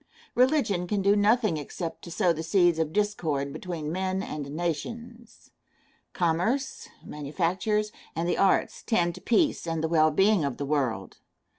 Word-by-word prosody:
Religion 245 - +2
can 200 +1 -1
do 200 +1 +4
nothing 210 -3 +3
except 165 +3 -6
to - - -10
sow 170 +1 +2
the 160 - -5
seeds 175 0 +3
of 160 -1 0
discord 160 -9 -1
between 160 -2 -5
men 190 +2 -1
and 145 -6 -5
nations. 230 +10 -5 0.6
Commerce, 180 +11 -1 0.2
manufactures, 185 +8 -1 0.2
and 165 +1 -1
the - - +1
arts 195 -1 +2
tend 175 -7 +1
to 185 - -11
peace 245 - +1
and 165 -1 -2
the - - +2
well 155 -1 +4
being 195 +3 +3
of 140 -3 -2
the 140 - -3
world. 130 -9 -2
175 Hz, 155 wpm, -27 LUFS, 155-210 Hz, 0.6 s, do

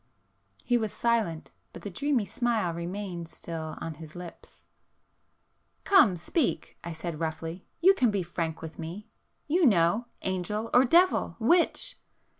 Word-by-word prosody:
He 245 -1 +2
was 220 -2 -2
silent, 225 -9 0 0.2
but - - -10
the 205 - -5
dreamy 265 +2 0
smile 220 -3 0
remained 175 0 -5
still 160 -2 -6
on 165 - -5
his 155 0 -12
lips. 175 -1 -11 1.2
"Come, 290 - +6
speak!" 205 - -1
I 170 - -5
said 165 -1 -5
roughly—"You 165 - +1
can 255 -11 +2
be 200 -3 0
frank 165 -2 -4
with 160 - -8
me, 170 +6 -7 0.4
you 345 +5 +2
know,—angel 210 - +1
or 250 +2 +7
devil—which?" 345 - +3
190 Hz, 125 wpm, -28 LUFS, 165-240 Hz, 1.2 s, or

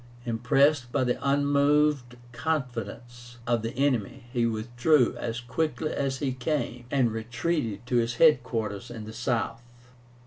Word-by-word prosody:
Impressed 125 +3 +2
by 130 - +1
the 125 -1 0
unmoved 140 -2 +2
confidence 120 -4 -4
of 120 -1 +1
the 115 +3 -4
enemy, 135 -2 0
he 120 -2 +2
withdrew 120 +5 +2
as 115 0 -3
quickly 155 +5 -2
as 135 -1 -1
he 135 -1 -1
came, 125 -2 -2
and 130 -4 +2
retreated 115 0 -2
to 125 0 +1
his 120 0 +1
head 155 -2 +6
quarters 110 -5 -4
in 115 -2 -7
the 110 - -8
South. 120 -1 -1
120 Hz, 140 wpm, -27 LUFS, 115-140 Hz, -, head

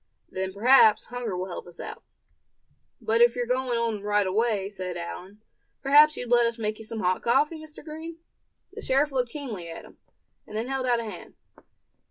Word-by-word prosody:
Then 190 0 -3
perhaps 220 +1 +5
hunger 240 -6 -5
will 185 - -2
help 180 -1 -7
us 175 -1 -13
out." - - -7 1.0
"But 225 -1 +1
if 240 0 +6
you're 245 -1 -1
going 250 0 0
on 230 -3 -1
right 205 0 +1
away," 205 0 0
said 185 -3 -5
Allan, 185 +4 -8 0.4
"perhaps 295 +2 +6
you'd 245 -1 -5
let 240 -1 +5
us 230 0 -3
make 215 -1 -3
you 220 - -9
some 220 0 -5
hot 185 0 +1
coffee, 295 +7 +2
Mr. 310 -1 -12
Green?" 320 +1 -8 0.6
The 440 - -8
sheriff 280 +3 +2
looked 250 -3 0
keenly 230 - -6
at 165 - -8
him, - - -18 0.5
and 215 - -6
then 230 +4 -3
held 265 -1 -1
out 240 -1 +3
a - - -5
hand. 210 -6 -9
230 Hz, 195 wpm, -26 LUFS, 205-260 Hz, 1.0 s, if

